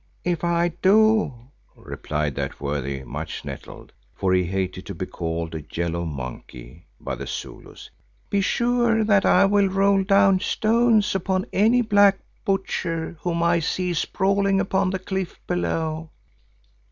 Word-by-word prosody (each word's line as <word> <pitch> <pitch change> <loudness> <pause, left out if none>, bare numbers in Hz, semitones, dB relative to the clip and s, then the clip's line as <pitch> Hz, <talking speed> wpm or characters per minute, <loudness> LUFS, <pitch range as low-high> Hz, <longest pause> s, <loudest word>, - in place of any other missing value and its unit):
"If 175 -2 -1
I 170 0 +2
do," 215 -1 +4 0.4
replied 75 -1 -4
that - - -4
worthy, 70 -1 -3
much - - -6
nettled, - - -9 0.2
for 95 -1 0
he 90 -1 +2
hated 95 0 -3
to 100 - -6
be 90 - -4
called 80 -2 -4
a 80 -2 -5
"yellow 85 0 -2
monkey" 65 -1 -8
by - - -5
the - - -6
Zulus, - - -8 0.4
"be 200 - +1
sure 235 +1 +2
that 205 -2 +3
I - - +5
will 200 0 +3
roll 195 +1 +3
down 195 -1 +4
stones 220 +1 +2
upon 190 0 -1
any 230 +5 +4
black 205 -3 +5 0.3
butcher 170 -4 -2
whom 170 -1 -1
I 170 0 +3
see 180 +2 -1
sprawling 195 +3 +1
upon 195 -1 +1
the 190 - -1
cliff 190 -1 -4
below." 160 -2 -2
185 Hz, 140 wpm, -23 LUFS, -, 0.4 s, I